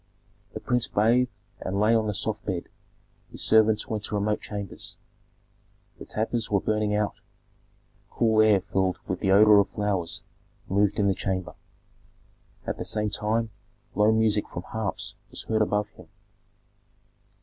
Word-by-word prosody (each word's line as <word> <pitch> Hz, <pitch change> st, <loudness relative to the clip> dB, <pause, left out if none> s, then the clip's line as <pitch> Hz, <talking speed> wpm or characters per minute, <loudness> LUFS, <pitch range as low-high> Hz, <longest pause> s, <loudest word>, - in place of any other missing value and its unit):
The -, -, -3 dB
prince 125 Hz, -1 st, +1 dB
bathed 120 Hz, +4 st, +3 dB, 0.3 s
and 95 Hz, +1 st, -3 dB
lay 110 Hz, +2 st, +4 dB
on 110 Hz, -1 st, +2 dB
the 105 Hz, -, -2 dB
soft 105 Hz, +1 st, -2 dB
bed; 90 Hz, -4 st, -4 dB, 0.6 s
his -, -, -3 dB
servants 110 Hz, -1 st, +4 dB
went 110 Hz, -4 st, -3 dB
to -, -, -3 dB
remote 105 Hz, +1 st, 0 dB
chambers. 100 Hz, -2 st, -7 dB, 1.0 s
The -, -, -8 dB
tapers 110 Hz, +1 st, -2 dB
were 100 Hz, -, +2 dB
burning 105 Hz, +1 st, 0 dB
out; 105 Hz, 0 st, 0 dB, 1.0 s
cool 110 Hz, -2 st, +3 dB
air 105 Hz, -3 st, +5 dB
filled 95 Hz, -1 st, 0 dB
with 90 Hz, -, -2 dB
the 95 Hz, -, 0 dB
odor 105 Hz, +1 st, +7 dB
of 100 Hz, -, +2 dB
flowers 100 Hz, -5 st, -2 dB, 0.4 s
moved 100 Hz, +1 st, +1 dB
in 100 Hz, -, +2 dB
the 100 Hz, -, +3 dB
chamber. 95 Hz, -1 st, -3 dB, 1.1 s
At -, -, -4 dB
the -, -, -2 dB
same 105 Hz, -1 st, -1 dB
time 110 Hz, +2 st, -1 dB, 0.4 s
low 105 Hz, +1 st, +4 dB
music 110 Hz, -2 st, +2 dB
from 90 Hz, -, -6 dB
harps 110 Hz, -2 st, -4 dB, 0.2 s
was -, -, -5 dB
heard 110 Hz, -1 st, 0 dB
above 105 Hz, -1 st, +1 dB
him. -, -, -16 dB
105 Hz, 150 wpm, -26 LUFS, 100-110 Hz, 1.1 s, odor